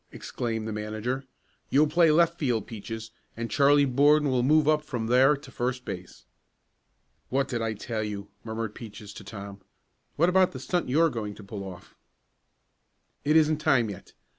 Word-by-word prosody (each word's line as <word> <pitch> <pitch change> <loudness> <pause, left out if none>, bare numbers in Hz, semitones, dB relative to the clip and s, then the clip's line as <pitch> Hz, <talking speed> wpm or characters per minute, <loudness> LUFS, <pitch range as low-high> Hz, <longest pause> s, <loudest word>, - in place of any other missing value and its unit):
exclaimed 115 -2 -4
the 110 - -3
manager. 110 +5 -3 0.4
"You'll 145 +3 +5
play 165 +2 +4
left 170 +2 +3
field, 120 -7 0
Peaches, 110 0 -7 0.3
and 115 -2 -4
Charlie 145 +2 +5
Borden 145 +2 +4
will 125 -1 +2
move 150 +3 +4
up 155 0 +4
from 125 -7 -4
there 130 +5 +5
to 135 -1 -13
first 125 +1 -3
base." 90 -1 -8 1.0
"What 135 +1 +1
did 120 -4 -3
I 115 -1 -1
tell 110 +1 -4
you?" 100 -1 -5
murmured 110 -1 -4
Peaches 105 -2 -10
to - - -10
Tom. 100 0 -9 0.5
"What 170 - +3
about 185 0 +3
the 130 - -6
stunt 175 +3 -1
you 135 - +1
were 165 -1 +4
going 105 -4 -4
to 105 - -12
pull 100 0 -7
off?" 90 -2 -10 1.3
"It 150 +2 +2
isn't 155 -1 +4
time 120 -7 +2
yet. 95 - -11
125 Hz, 175 wpm, -27 LUFS, 110-150 Hz, 1.3 s, You'll